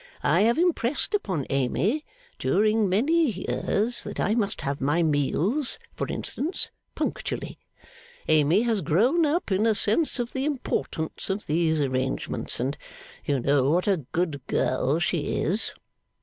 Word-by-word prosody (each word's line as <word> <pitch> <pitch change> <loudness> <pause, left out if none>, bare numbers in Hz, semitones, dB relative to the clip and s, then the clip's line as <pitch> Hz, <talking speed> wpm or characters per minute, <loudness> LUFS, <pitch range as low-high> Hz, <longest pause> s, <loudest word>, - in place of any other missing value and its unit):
I 170 +6 +3
have 230 +3 +3
impressed 325 - +1
upon 185 - -1
Amy 170 - 0 0.4
during 215 0 +2
many 295 - +3
years, 215 +3 -1
that - - -7
I 210 - +2
must 210 -4 0
have 140 0 -3
my 150 +6 +2
meals 165 - 0 0.2
(for - - -3
instance) 315 +7 -1 0.2
punctually. - - -3 0.7
Amy 155 +7 +4
has 225 -4 +1
grown 240 - +3
up 305 - -1
in 200 +4 +2
a 220 - +3
sense 225 +12 +1
of 240 -1 -3
the 265 - -2
importance 255 - -2
of 195 +2 -2
these 160 0 +1
arrangements, 130 -1 -1
and 135 +4 -2 0.5
you 140 -2 +1
know 140 +1 +2
what 175 +6 +1
a 195 -2 +3
good 160 -5 -1
girl 130 +3 +1
she 170 -2 -1
is. 195 +8 0
190 Hz, 145 wpm, -26 LUFS, 150-240 Hz, 0.7 s, Amy